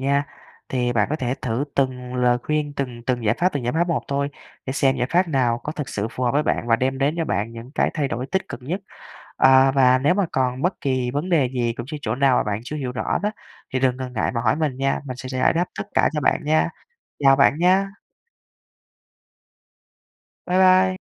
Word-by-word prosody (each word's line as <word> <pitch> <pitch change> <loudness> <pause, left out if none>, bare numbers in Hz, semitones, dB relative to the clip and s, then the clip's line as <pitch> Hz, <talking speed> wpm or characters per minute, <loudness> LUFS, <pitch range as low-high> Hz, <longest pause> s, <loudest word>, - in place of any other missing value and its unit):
nha. 140 +1 +1 0.4
Thì 125 -2 0
bạn 105 -3 +2
có 155 - 0
thể 130 -3 -2
thử 125 +3 -1
từng 125 -2 -1
lời 125 -1 +2
khuyên, 150 -1 -1
từng 125 -4 -4
từng 120 -1 -2
giải 105 +2 +3
pháp, 180 +1 +2
từng 140 -4 -3
giải 120 - 0
pháp 170 +2 +1
một 170 - 0
thôi, 140 0 0 0.4
để 130 - -2
xem 135 -1 +2
giải 125 -1 0
pháp 180 +1 +2
nào 125 -6 +1
có 150 - -3
thực 150 -5 -5
sự 105 +2 -3
phù 125 +1 -3
hợp 120 - +2
với 145 +2 +2
bạn 135 - -1
và 115 - +4
đem 130 +2 -1
đến 140 +3 +1
cho 165 - +1
bạn 105 -1 -2
những 115 +2 -10
cái - - +1
thay 145 -4 0
đổi 125 0 -3
tích 190 +6 -2
cực - - -8
nhất. 175 +9 -3 0.6
À, 135 0 +6
và 130 -2 +4
nếu 145 +6 +3
mà 200 0 +1
còn 130 0 0
bất 180 +3 -1
kỳ 130 -4 0
vấn 150 +7 -3
đề 145 -8 +3
gì 120 -2 -1
cũng 120 - -5
chư 150 +2 -6
chỗ 110 -2 -2
nào 135 -1 +3
mà - - +2
bạn 105 0 -2
chưa 150 - -6
hiểu 135 -4 -3
rõ 125 - -1
đó, 210 - +1 0.4
thì 130 - +1
đừng 130 -1 +1
ngần 130 -1 -6
ngại 110 - 0
mà 115 - 0
hỏi 110 -2 +2
mình 150 -4 -1
nha, 135 0 0
mình 130 -2 -6
sẽ 130 0 -7
giải 130 -1 +2
đáp 175 +2 +1
tất 200 - -4
cả - - +3
cho 150 - -1
bạn - - +2
nha. 155 +2 +2 0.5
Chào 135 -1 +6
bạn 140 +2 +3
nha! 190 +3 +3 2.6
Bye 180 - 0
bye! 185 0 +5
135 Hz, 240 wpm, -22 LUFS, 125-150 Hz, 2.6 s, À